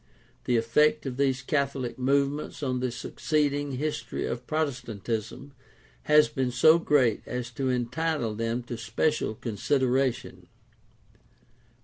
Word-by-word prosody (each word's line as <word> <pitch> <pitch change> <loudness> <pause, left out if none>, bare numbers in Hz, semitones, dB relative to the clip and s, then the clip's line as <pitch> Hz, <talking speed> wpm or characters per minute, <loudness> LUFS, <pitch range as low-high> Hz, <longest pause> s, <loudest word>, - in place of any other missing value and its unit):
The 120 - +2
effect 150 +7 +2
of 130 -2 -4
these 135 -1 +1
Catholic 135 -3 -1
movements 140 +3 0
on 130 -2 0
the 125 0 -1
succeeding 145 +3 -1
his 145 0 -2
tory 120 - -4
of 120 +1 -5
Protestantism 125 -3 -3 0.5
has 150 0 +6
been 130 -2 -1
so 155 +7 +5
great 130 -9 +2
as 125 -1 -4
to 130 +2 -2
entitle 125 0 -1
them 115 +2 -2
to 120 -1 -6
special 115 +1 0
consideration. 130 +4 -1
130 Hz, 120 wpm, -27 LUFS, 120-145 Hz, 0.5 s, has